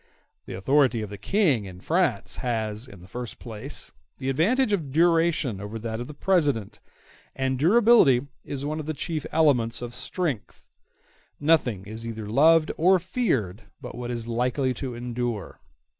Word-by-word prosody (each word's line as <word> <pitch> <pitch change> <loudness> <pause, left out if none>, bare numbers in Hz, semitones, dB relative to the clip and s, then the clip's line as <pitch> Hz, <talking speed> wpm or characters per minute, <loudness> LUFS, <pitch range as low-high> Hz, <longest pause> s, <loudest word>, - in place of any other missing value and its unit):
The 95 - -6
authority 120 +3 +2
of 105 - -7
the 100 - -6
King, 150 - +2
in 90 -2 -10
France, 155 - 0
has, 110 -2 -3
in 100 -8 -13
the 90 - -13
first 120 +4 -6
place, 120 +4 -6 0.3
the 135 -1 -3
advantage 210 - +2
of 165 -8 -1
duration 165 - +2
over 105 +2 -6
that 110 0 -4
of 120 - -5
the 150 - -10
President, 145 - +1 0.6
and 130 -1 -1
durability 180 - +5 0.2
is 140 0 -5
one 155 +2 -2
of 155 - -6
the 155 - -2
chief 155 +1 -3
elements 125 -8 +2
of 120 -1 -6
strength; 130 - -4 0.7
nothing 130 - +2
is 110 +2 -7
either 110 -2 -5
loved 155 +7 +4
or 185 +4 +5
feared 130 - -1
but - - -8
what 120 0 -6
is 120 -1 -4
likely 125 +3 0
to 125 -2 -5
endure. 120 -3 -4
130 Hz, 160 wpm, -25 LUFS, 115-160 Hz, 0.7 s, durability